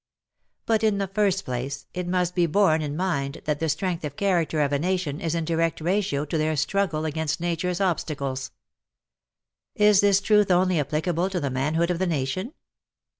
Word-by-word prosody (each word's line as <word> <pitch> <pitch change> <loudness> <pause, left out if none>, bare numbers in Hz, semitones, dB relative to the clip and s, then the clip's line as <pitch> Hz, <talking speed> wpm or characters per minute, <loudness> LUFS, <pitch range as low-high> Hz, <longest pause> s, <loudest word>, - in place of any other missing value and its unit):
But 225 -1 +1
in 215 -2 +3
the 200 - 0
first 195 -1 +1
place, 130 +3 -4
it 180 -1 -4
must 180 -1 0
be 175 -2 +2
borne 160 -2 +3
in 150 0 -3
mind 150 -6 -2
that 150 -1 -1
the 160 - -1
strength 170 +3 -2
of 145 -2 -5
character 170 -5 +1
of 145 -1 +1
a 140 - +1
nation 175 -3 -1
is 165 0 -1
in 165 -1 -1
direct 165 0 0
ratio 170 -4 0
to 155 +2 -2
their 155 0 +1
struggle 160 +1 0
against 160 0 -2
nature's 175 +1 -1
obstacles. 140 -8 -2 1.3
Is 210 -1 +5
this 200 -1 +4
truth 210 0 +3
only 180 -1 +3
applicable 160 +5 -1
to 185 -2 -2
the 140 -4 -2
manhood 155 +7 0
of 175 - -2
the 190 - +1
nation? 170 - -2
170 Hz, 180 wpm, -25 LUFS, 150-190 Hz, 1.3 s, Is